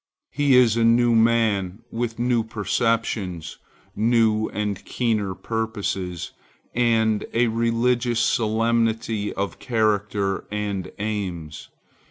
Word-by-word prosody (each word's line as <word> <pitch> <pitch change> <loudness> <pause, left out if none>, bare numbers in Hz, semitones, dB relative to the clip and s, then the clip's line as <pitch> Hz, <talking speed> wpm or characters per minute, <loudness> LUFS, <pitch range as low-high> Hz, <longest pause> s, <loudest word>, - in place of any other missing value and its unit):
He 145 -2 +3
is 120 -3 +5
a 115 - +2
new 120 +1 +4
man, 110 -3 +2
with 115 -1 -3
new 120 -1 +1
perceptions, 105 -5 -2 0.4
new 110 -1 +2
and 105 -2 -3
keener 110 -6 -1
purposes, 100 -6 -3 0.4
and 110 -3 +2
a 120 0 +3
religious 115 +1 +1
solemnity 115 -1 +1
of 100 0 -4
character 105 -4 0
and 100 -3 -3
aims. 95 -7 -4
110 Hz, 100 wpm, -23 LUFS, 105-115 Hz, 0.4 s, is